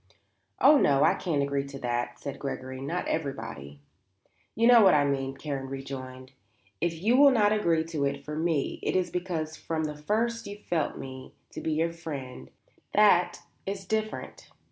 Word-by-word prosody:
"Oh 290 +1 +7
no; 140 - +4
I - - +5
can't 150 -5 -1
agree 140 0 -1
to 140 0 -8
that," 120 -1 -3
said 140 -2 -6
Gregory. 130 -1 -5
"Not 165 +6 -3
everybody." 115 - -4 0.7
"You 230 - +2
know 240 -1 +8
what 190 -6 +6
I 145 -1 +4
mean," 135 -1 -1
Karen 140 -3 -4
rejoined. 130 -1 -7 0.5
"If 165 -2 -1
you 230 +4 +4
will 280 +2 +8
not 215 -5 +3
agree 170 -6 +2
to 160 -3 -2
it 140 0 -3
for 150 - -5
me, 160 -2 -1
it - - -1
is 185 -1 +1
because 170 -4 -3
from 160 -1 -3
the 150 -1 -3
first 225 +9 -1
you 200 0 -7
felt 170 -7 -2
me 130 -1 -9 0.2
to - - -7
be 160 - -1
your 165 +2 0
friend; 145 -6 -7 0.5
that 200 -4 +4 0.3
is 195 0 -4
different." 215 +2 -4
155 Hz, 175 wpm, -28 LUFS, 135-185 Hz, 0.7 s, know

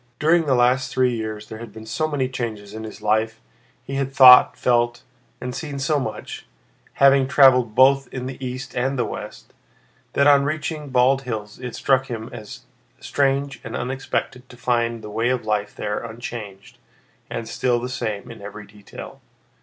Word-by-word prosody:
During 160 +2 +3
the 135 - +3
last 125 +1 +2
three 130 -1 +2
years 110 -2 -5
there 110 - -9
had 115 -2 -9
been 110 +1 -11
so 135 +8 -1
many 145 -4 -1
changes 110 -5 -5
in 110 0 -6
his 105 -1 -10
life, 110 +1 +1 0.4
he 135 - -8
had 135 -1 -1
thought, 130 -2 +8
felt, 120 -1 +1 0.4
and 125 0 -5
seen 145 +1 -5
so 140 +2 +1
much 110 - -6 0.5
(having 140 -1 +5
traveled 125 -5 +5
both 135 +1 +5
in 125 -1 -5
the 130 0 -7
east 130 +1 -6
and 135 +2 0
the 120 - +1
west), - - -8 0.6
that 140 - +3
on 140 -1 +6
reaching 155 0 -3
Bald 130 +1 +3
Hills 110 -5 -6
it 125 -2 -6
struck 135 -1 +2
him 115 -2 -6
as 105 - -9 0.4
strange 140 0 -1
and 115 - -6
unexpected 130 0 -3
to 125 - -14
find 120 -2 -1
the 105 - -8
way 115 +3 0
of 125 -3 -1
life 105 -1 -1
there 105 0 -3
unchanged 115 0 -8 0.5
and 115 -1 -5
still 120 -2 0
the 125 - -4
same 110 -5 -4
in - - -11
every 105 +1 -9
detail. 105 -1 -12
125 Hz, 175 wpm, -22 LUFS, 110-135 Hz, 0.6 s, thought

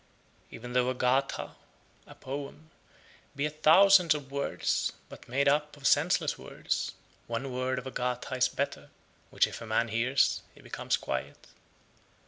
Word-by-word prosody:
101. - - -10
Even 120 +1 -8
though 125 0 +2
a 130 - -2
Gatha 130 +2 0 0.7
(poem) 140 +3 -7 0.6
be 140 +1 -1
a 150 - -2
thousand 170 +2 +6
(of 140 -2 -7
words), 140 0 -1 0.2
but - - -13
made 140 +3 +1
up 150 +1 +1
of 140 - -12
senseless - - +2
words, - - -3 0.3
one 120 +3 -4
word 130 +1 -1
of 125 - -5
a 130 - -5
Gatha 125 +1 -3
is 130 0 +3
better, 140 +2 -4 0.4
which - - +3
if - - -8
a 115 - -7
man 115 +1 +1
hears, 120 +5 +2
he - - -16
becomes - - -2
quiet. 70 +2 -5
130 Hz, 155 wpm, -29 LUFS, 125-145 Hz, 0.7 s, thousand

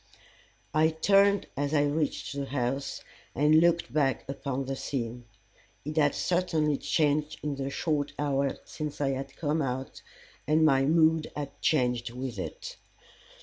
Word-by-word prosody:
I 155 +1 +4
turned 200 +5 +3
as 145 +2 -1
I 145 - +4
reached 145 -1 -1
the 140 -1 -2
house, 135 +1 -2 0.3
and 150 +3 +5
looked 170 -7 +2
back 140 -3 +1
upon 135 -1 -3
the 135 +1 -3
scene. 120 -3 -4 0.6
It 150 +1 -4
had 145 -2 +3
certainly 160 -5 +1
changed 150 0 0
in 150 -1 -1
the 135 0 -3
short 145 0 -1
hour 140 -2 0
since 150 -2 -6
I 140 -2 +1
had 135 0 -4
come 155 0 0
out, 130 -1 -4 0.5
and 155 +1 +4
my 135 -3 +4
mood 160 +1 +3
had 145 -2 -4
changed 125 -5 +1
with 125 0 -6
it. - - -6
145 Hz, 145 wpm, -28 LUFS, 135-155 Hz, 0.6 s, and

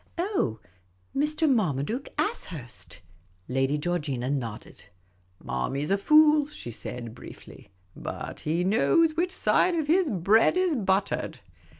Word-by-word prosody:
" - - -37
Oh, 345 - -1 0.6
Mr. 305 +3 +1
Marmaduke 215 - 0
Ashurst." 160 - -4 0.5
I<ady 135 +3 0
Georgina 145 -6 -2
nodded. 120 -7 -5 0.3
" 90 0 -38
Marmy 135 - -2
's 150 - -2
a 195 - +4
fool," 305 +4 +5
she 295 - -8
.said, 115 0 -7
briefly; - - -13
" 90 - -36
but - - -6
he 165 +3 -1
knows 310 - +3
which 350 +2 0
side 365 -1 +2
of 320 -3 0
his 335 +2 +3
bread 210 - +3
is 365 -4 +2
buttered." 195 -4 -1
195 Hz, 135 wpm, -27 LUFS, -, 0.6 s, fool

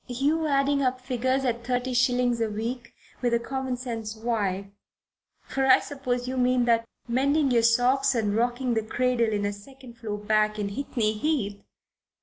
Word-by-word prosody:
You 290 +6 0
adding 280 0 +2
up 255 -1 0
figures 255 +1 -1
at 235 -1 -1
thirty 250 +1 -1
shillings 245 -1 +2
a 225 - +1
week, 235 +3 -5 0.3
with 240 -2 +2
a - - +2
common 260 +1 -3
sense 225 -3 -5
wife 210 -4 -1 0.8
for 270 0 -1
I 260 0 +8
suppose 250 -4 -3
you 260 +1 -3
mean 250 -1 +3
that 230 -1 +2 0.2
mending 275 +4 +2
your 235 -1 +4
socks 245 +4 +3
and 210 -3 0
rocking 245 +2 0
the 225 - +1
cradle 235 +1 0
in 205 -1 -1
a 205 - -1
second 245 +3 -14
floor 210 -3 -4
back 215 0 +1
in 205 -1 -2
Hickney 220 -1 -1
Heath! 235 -9 -1
245 Hz, 170 wpm, -26 LUFS, 225-260 Hz, 0.8 s, I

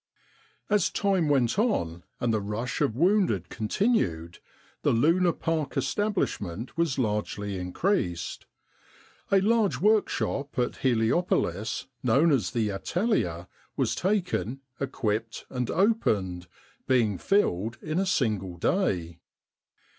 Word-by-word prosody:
As 205 -4 +2
time 190 -6 +1
went 135 - +2
on, 85 - 0 0.2
and 120 -2 +1
the 110 - +1
rush 105 +7 -3
of 140 -7 +1
wounded 170 - +2
con 110 -2 -3
tinued, 85 - 0 0.4
the - - +2
Luna 170 +9 +3
Park 160 -3 -2
establishment 130 - -2
was 165 -5 0
largely 105 -4 -2
increased. 90 - -1 0.8
A 195 - +6
large 215 0 +2
workshop 200 -9 +1
at 125 -1 0
Heliopolis, 115 - 0 0.2
known 135 +7 +4
as 120 -10 +2
The 110 -3 0
Atelier, 95 - -1 0.3
was - - +1
taken, 180 - -1 0.2
equipped 115 -4 -2
and 125 -2 -2
opened, 100 - +1 0.4
being 115 -7 +2
filled 115 - +1
in 155 +3 -2
a 195 - 0
single 105 - 0
day. 85 - 0
125 Hz, 115 wpm, -27 LUFS, -, 0.8 s, A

